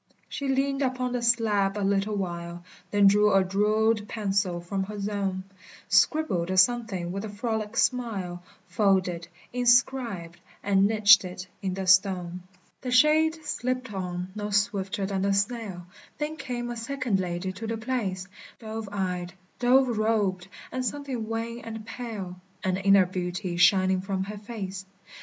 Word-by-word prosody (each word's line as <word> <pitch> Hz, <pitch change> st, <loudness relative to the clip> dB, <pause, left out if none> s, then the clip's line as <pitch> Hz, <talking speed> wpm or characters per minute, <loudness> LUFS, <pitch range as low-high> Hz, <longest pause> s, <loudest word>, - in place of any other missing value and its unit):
She 280 Hz, -, -4 dB
leaned 275 Hz, +1 st, 0 dB
upon 255 Hz, -1 st, -1 dB
the 245 Hz, -1 st, -1 dB
slab 215 Hz, -4 st, +2 dB
a 205 Hz, -, -1 dB
little 200 Hz, +1 st, +1 dB
while, 175 Hz, -2 st, -4 dB, 0.3 s
Then 205 Hz, -1 st, +3 dB
drew 210 Hz, +1 st, +5 dB
a 195 Hz, -1 st, +5 dB
jewelled 210 Hz, +3 st, +1 dB
pencil 195 Hz, -5 st, -1 dB
from 190 Hz, +3 st, -3 dB
her 210 Hz, +1 st, -7 dB
zone, 200 Hz, -2 st, -2 dB, 0.5 s
Scribbled 205 Hz, -, +2 dB
a 185 Hz, -, -1 dB
something 195 Hz, -4 st, +2 dB
with 195 Hz, +2 st, -4 dB
a 220 Hz, -, -5 dB
frolic 220 Hz, +1 st, -3 dB
smile, 200 Hz, -8 st, 0 dB, 0.2 s
Folded, 185 Hz, -5 st, +1 dB, 0.3 s
inscribed, 240 Hz, -8 st, +1 dB, 0.2 s
and 195 Hz, -1 st, +3 dB
niched 210 Hz, -2 st, +6 dB
it 185 Hz, 0 st, -7 dB, 0.2 s
in 190 Hz, -2 st, -2 dB
the 190 Hz, 0 st, -3 dB
stone. 185 Hz, -2 st, +3 dB, 0.4 s
The 255 Hz, -, -4 dB
shade 310 Hz, +4 st, +4 dB
slipped 255 Hz, -4 st, -2 dB
on, 180 Hz, -1 st, -4 dB
no 210 Hz, 0 st, -4 dB
swifter 200 Hz, -1 st, 0 dB
than 190 Hz, -1 st, -2 dB
the 200 Hz, +1 st, +2 dB
snail; 200 Hz, -3 st, -2 dB, 0.3 s
There 300 Hz, +1 st, -3 dB
came 240 Hz, -4 st, -4 dB
a 240 Hz, -, -5 dB
second 245 Hz, -4 st, -1 dB
lady 180 Hz, +1 st, -3 dB
to 220 Hz, +4 st, -6 dB
the 225 Hz, 0 st, -2 dB
place, 215 Hz, -6 st, -3 dB, 0.3 s
Dove 220 Hz, -2 st, -6 dB
eyed, 180 Hz, -3 st, -3 dB, 0.3 s
dove 245 Hz, -2 st, +3 dB
robed, 205 Hz, -4 st, 0 dB, 0.2 s
and 255 Hz, 0 st, -2 dB
something 255 Hz, -3 st, -3 dB
wan 230 Hz, +1 st, -3 dB
and 225 Hz, -2 st, -8 dB
pale, 215 Hz, -7 st, -6 dB, 0.3 s
An 185 Hz, -1 st, 0 dB
inner 195 Hz, -1 st, +5 dB
beauty 180 Hz, 0 st, -3 dB
shining 185 Hz, +1 st, +4 dB
from 190 Hz, 0 st, -2 dB
her 205 Hz, +1 st, -7 dB
face. 200 Hz, -4 st, -6 dB
205 Hz, 150 wpm, -27 LUFS, 190-235 Hz, 0.5 s, niched